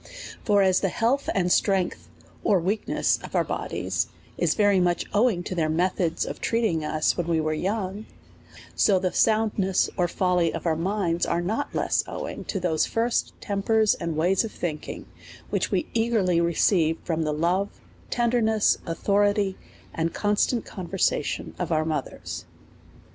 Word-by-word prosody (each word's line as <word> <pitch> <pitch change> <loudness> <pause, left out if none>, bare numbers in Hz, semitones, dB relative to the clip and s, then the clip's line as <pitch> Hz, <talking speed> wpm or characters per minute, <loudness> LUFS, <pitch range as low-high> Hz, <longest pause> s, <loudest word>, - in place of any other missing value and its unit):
For 205 -2 +4
as 185 -1 +4
the 195 - 0
health 245 +9 0
and 180 -2 +1
strength, 190 -2 +1 0.3
or 195 - +3
weakness, 195 +5 0
of - - -8
our - - +3
bodies - - -2 0.3
is - - +1
very 205 -3 +4
much 175 -1 +1
owing 210 -4 +2
to 185 - -4
their 160 -3 0
methods 170 0 0
of - - -6
treating 220 -9 0
us 155 0 +1
when 175 -2 -2
we 165 -1 +1
were 155 0 0
young; 195 +4 -3 0.7
so 200 -3 +3
the 185 -1 -1
soundness 215 -4 +2
or 175 -2 +2
folly 180 -2 +1
of - - -6
our 165 -2 +2
minds 175 0 0
is 170 - 0
not 220 +10 -2
less - - +1
owing - - -6
to 195 - -2
those 170 -3 +1
first 230 +1 0
tempers 215 +1 +2
and 165 -2 -4
ways 180 +6 +2
of 225 - -5
thinking, 155 -4 -5 0.5
which - - 0
we - - 0
eagerly 220 -7 +2
re 170 -1 0
ceived 165 -4 +3
from 165 -2 -1
the 155 -1 0
love, 175 +6 +1 0.4
tenderness, 230 -3 +2
authority, 200 +3 +1 0.4
and 165 0 -2
con 210 0 +1
stant 235 +2 +1
conversation 180 -4 -2
of 175 -1 -2
our 155 -1 +2
mothers. 155 -4 -4
185 Hz, 160 wpm, -25 LUFS, 170-210 Hz, 0.7 s, For